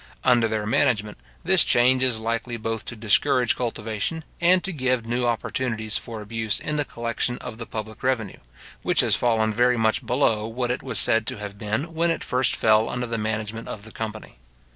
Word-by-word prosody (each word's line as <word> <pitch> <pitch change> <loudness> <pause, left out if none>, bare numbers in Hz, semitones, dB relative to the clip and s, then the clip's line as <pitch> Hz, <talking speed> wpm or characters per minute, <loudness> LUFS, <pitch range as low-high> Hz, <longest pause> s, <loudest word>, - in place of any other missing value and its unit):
Under 120 -3 +4
their 110 -1 -2
management, 105 -1 +1 0.2
this 180 -1 +4
change 125 0 +4
is 130 -3 +2
likely 115 +2 -2
both 115 0 -4
to - - -6
discourage 115 +2 +2
cultivation, 115 +6 -3 0.2
and 180 +1 +4
to 195 - -3
give 130 -5 0
new 120 +1 0
opportunities 110 -2 -2
for 115 -3 -8
abuse 110 0 -2
in 150 - -3
the 150 -1 0
collection 115 0 -2
of 110 - -8
the 115 - -6
public 110 0 -6
revenue, 125 -6 -1 0.4
which - - +2
has - - +3
fallen 110 -2 +2
very 125 +2 +3
much 110 -1 +1
below 115 -4 +1
what 120 +2 -2
it 125 - -2
was 125 -5 -3
said 115 0 +4
to - - -2
have 100 -1 -7
been 110 +11 -2
when 165 +1 +1
it 165 - -1
first 125 0 +1
fell 110 0 +3
under 125 0 -2
the 115 -1 -3
management 110 +1 -3
of 100 - -7
the 110 - -11
company. 110 - -7
115 Hz, 195 wpm, -24 LUFS, 110-125 Hz, 0.4 s, Under